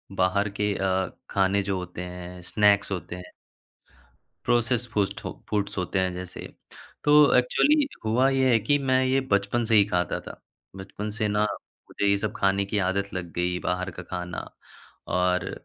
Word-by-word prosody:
बाहर 100 +3 +1
के 105 -1 +1
अ, 95 -1 0 0.2
खाने 100 +1 +2
जो 95 -1 -1
होते 90 0 -6
हैं 90 0 -8
स्नैक्स 100 +2 +3
होते 90 -2 -4
हैं 90 0 -10 1.1
प्रोसेस 120 0 +1
फू 100 -1 +3 0.4
फूड्स 100 -1 -1
होते 90 +1 -1
हैं 95 -1 +1
जैसे। 90 0 -7 0.6
तो 150 0 +6
एक्चुअली 280 - +3 0.2
हुआ 120 +5 +3
ये 130 -1 +3
है 115 - +5
कि 145 +7 +2
मैं 130 -2 +2
ये 130 +1 +2
बचपन 100 +4 +1
से 115 0 +1
ही 105 -2 +7
खाता 90 -3 -1
था, - - -11 0.4
बचपन 100 +2 -6
से 110 0 -1
ना 105 +1 +2 0.5
मुझे 100 - -1
ये 100 0 +4
सब 105 +1 -2
खाने 100 0 +2
की 100 +1 -2
आदत 100 +1 -2
लग 90 -2 -5
गई 90 +1 -1
बाहर 90 +1 -2
का 90 - -9
खाना, 90 0 -6 0.7
और 90 +1 +1
100 Hz, 170 wpm, -26 LUFS, 90-110 Hz, 1.1 s, ही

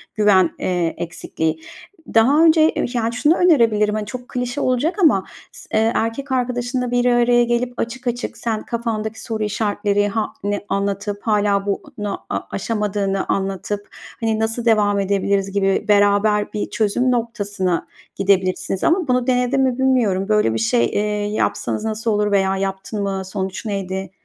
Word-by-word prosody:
güven, 200 -5 +4
eee, 175 -3 0
eksikliği. 160 -2 -3 0.5
Daha 270 +8 +5
önce, 320 -1 +5
eee, - - -1
yani, 230 -1 -1
şunu 295 +7 +3
önerebilirim, 230 -12 +3
hani, 215 -1 -2
çok 250 +3 -8
klişe 250 +3 -3
olacak 255 +7 +1
ama 195 - +4 0.3
s - - -12
eee, 220 +1 +3
erkek 230 +5 -2
arkadaşınla 250 0 -1
bir 245 0 +1
araya 240 0 +4
gelip 240 +1 -1
açık 245 +2 -4
açık 245 +1 -3
sen 220 -2 -2
kafandaki 225 -2 -3
soru 220 -1 -3
işaretleri 205 -1 0
ha 215 +1 -2
ne 205 0 -2
anlatıp 200 +1 -2
hâlâ 205 -2 +1
bunu 205 0 -4
a - - -1
aşamadığını 200 -2 -1
anlatıp, 195 +1 -2 0.3
hani, 225 -1 0
nasıl 225 +2 -1
devam 210 -3 +3
edebiliriz 195 0 0
gibi 195 -1 +1
beraber 205 0 +3
bir 210 - -3
çözüm 230 +4 +1
noktasına 205 -7 -1 0.3
gidebilirsiniz 190 -1 0
ama 345 -1 +2
bunu 250 -1 +1
denedin 250 +1 +2
mi 260 -2 +1
bilmiyorum. 230 -8 +1
Böyle 210 - +3
bir 115 - -1
şey, 115 +1 +2
eee, 205 - -1 0.3
yapsanız 215 - -1
nasıl 220 +1 -1
olur 210 0 +1
veya 195 -1 +2
yaptın 195 +2 -3
mı, 195 -1 -2
sonuç 190 +1 -4
neydi? 190 -2 -4
210 Hz, 155 wpm, -20 LUFS, 200-240 Hz, 0.5 s, Daha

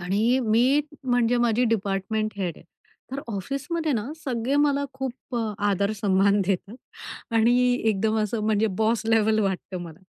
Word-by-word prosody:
आणि 210 +8 +1
मी 245 +6 +3 0.2
म्हणजे 245 -1 +2
माझी 240 0 +2
डिपार्टमेंट 215 0 -1
हेड 180 -5 -3
आहे, - - -16 0.5
तर 270 +2 -4
ऑफिसमध्ये 285 - -2
ना, 220 -5 -1 0.2
सगळे 255 +1 -1
मला 285 -1 +2
खूप 265 -1 -6
अ 225 -2 -1 0.2
आदर, 200 +1 +1
सन्मान 200 -1 +2
देतात 195 +4 -2 0.6
आणि 230 +2 +4 0.3
एकदम 215 +1 +1
असं 215 +1 -1
म्हणजे 220 0 +2
बॉस 225 +1 +2
लेव्हल 220 -1 +3
वाटतं 190 -2 -2
मला. 165 -2 -10
220 Hz, 150 wpm, -25 LUFS, 200-245 Hz, 0.6 s, आणि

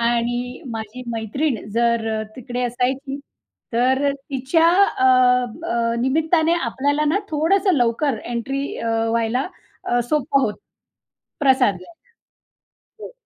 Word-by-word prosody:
आणि 240 +1 -1
माझी 225 +2 -6
मैत्रीण 225 +2 -2
जर 235 -1 +1 0.3
तिकडे 250 0 -4
असायची 260 +3 -2 0.5
तर 260 +4 +2
तिच्या, 280 +4 +1 0.3
अ, 260 - +2 0.7
अ, 230 0 0
निमित्ताने 315 +5 +2
आपल्याला 285 +3 0
ना 355 +7 +2
थोडंसं 365 +6 +2
लवकर 240 0 +1
एंट्री 270 +4 -3
अ, 230 - -3 0.2
व्हायला 230 +4 0 0.4
अ, 245 - +1
सोपं 280 -1 +2
होतं, 210 - -1 0.8
प्रसाद 260 -7 +3
घ्यायला. 180 - -14 1.1
हो. - - -8
255 Hz, 110 wpm, -21 LUFS, 235-285 Hz, 1.1 s, प्रसाद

